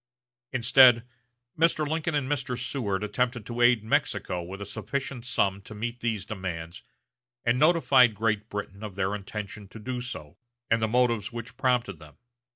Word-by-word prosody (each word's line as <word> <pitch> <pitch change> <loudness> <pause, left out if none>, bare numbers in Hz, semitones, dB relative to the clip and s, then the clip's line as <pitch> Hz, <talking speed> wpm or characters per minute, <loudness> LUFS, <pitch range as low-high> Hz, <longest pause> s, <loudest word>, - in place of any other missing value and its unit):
Instead, 125 -1 +6 0.5
Mr. 155 -1 +2
Lincoln 160 +1 -1
and 140 -3 0
Mr. 135 -3 -2
Seward 115 -6 -2
attempted 120 +1 -1
to 120 +1 -4
aid 120 -3 +5
Mexico 90 -4 0
with 95 +3 -8
a 100 - -5
sufficient 130 +3 -4
sum 100 -6 0
to 110 +2 -11
meet 115 +3 -4
these 110 -5 -2
demands, 85 -5 -5 0.6
and 120 +1 +2
notified 140 -7 +5
Great 105 0 0
Britain 100 -1 -6
of 105 -3 -6
their 95 0 0
intention 105 0 -6
to 110 - -12
do 125 +3 -4
so, 100 - -7 0.3
and 115 0 +3
the 110 - +2
motives 120 -2 +1
which 115 -1 -7
prompted 125 -9 0
them. 75 -2 -15
115 Hz, 160 wpm, -27 LUFS, 100-125 Hz, 0.6 s, Instead